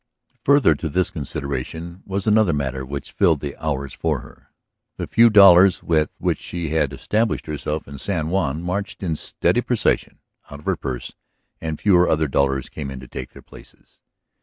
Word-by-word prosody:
Further 140 Hz, -, +5 dB
to 80 Hz, +2 st, -4 dB
this 90 Hz, +5 st, 0 dB
consideration 80 Hz, +3 st, -5 dB
was 95 Hz, 0 st, -3 dB
another 105 Hz, -4 st, +4 dB
matter 65 Hz, -2 st, -2 dB
which 70 Hz, +2 st, -6 dB
filled 85 Hz, -7 st, +2 dB
the 70 Hz, 0 st, -5 dB
hours 70 Hz, -3 st, -2 dB
for -, -, -1 dB
her. -, -, -17 dB, 0.5 s
The -, -, -3 dB
few 115 Hz, +1 st, +5 dB
dollars 95 Hz, -3 st, +7 dB
with 80 Hz, -2 st, +1 dB
which -, -, -1 dB
she 85 Hz, -3 st, -5 dB
had 75 Hz, -3 st, +1 dB
established 105 Hz, +12 st, -1 dB
herself 75 Hz, 0 st, -4 dB
in 70 Hz, -1 st, -9 dB
San 80 Hz, -4 st, -1 dB
Juan 85 Hz, -4 st, -1 dB
marched 100 Hz, +3 st, -4 dB
in 85 Hz, -4 st, -1 dB
steady -, -, 0 dB
procession -, -, 0 dB, 0.3 s
out 70 Hz, -, -8 dB
of 75 Hz, -, -16 dB
her -, -, +1 dB
purse 65 Hz, -2 st, -5 dB, 0.5 s
and 80 Hz, -2 st, -4 dB
fewer 90 Hz, -4 st, +4 dB
other 80 Hz, 0 st, +2 dB
dollars 70 Hz, -1 st, 0 dB
came 75 Hz, -3 st, -6 dB
to 65 Hz, -, -11 dB
take 65 Hz, -, -8 dB
their -, -, -14 dB
places. -, -, -17 dB
80 Hz, 175 wpm, -22 LUFS, 70-95 Hz, 0.5 s, dollars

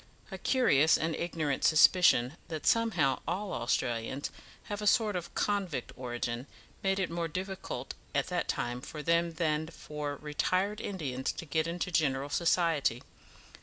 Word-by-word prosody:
A -, -, -6 dB
curious 160 Hz, -, +4 dB
and 160 Hz, 0 st, -1 dB
ignorant 160 Hz, -5 st, -2 dB
suspicion 155 Hz, -5 st, +5 dB
that 160 Hz, -2 st, -5 dB
somehow 185 Hz, -, +3 dB
all 190 Hz, +4 st, -2 dB
Australians 120 Hz, +2 st, -1 dB, 0.3 s
have 205 Hz, 0 st, -5 dB
a 210 Hz, -, -1 dB
sort 215 Hz, -1 st, +3 dB
of 175 Hz, -2 st, -5 dB
convict 190 Hz, -10 st, -1 dB
origin, 120 Hz, 0 st, -4 dB, 0.3 s
made 195 Hz, 0 st, +1 dB
it 185 Hz, -3 st, -1 dB
more 170 Hz, 0 st, -1 dB
difficult 185 Hz, +4 st, -5 dB, 0.2 s
at -, -, +2 dB
that -, -, -1 dB
time 120 Hz, +1 st, -2 dB
for 150 Hz, +2 st, -7 dB
them 170 Hz, +1 st, +2 dB
than 155 Hz, -1 st, 0 dB
for 150 Hz, -2 st, -5 dB
retired 185 Hz, +8 st, -1 dB
Indians 140 Hz, -10 st, -2 dB
to -, -, -7 dB
get 160 Hz, +1 st, 0 dB
into 175 Hz, +2 st, -3 dB
general 140 Hz, -4 st, +1 dB
society. 165 Hz, -6 st, +1 dB
160 Hz, 145 wpm, -31 LUFS, 140-185 Hz, 0.3 s, suspicion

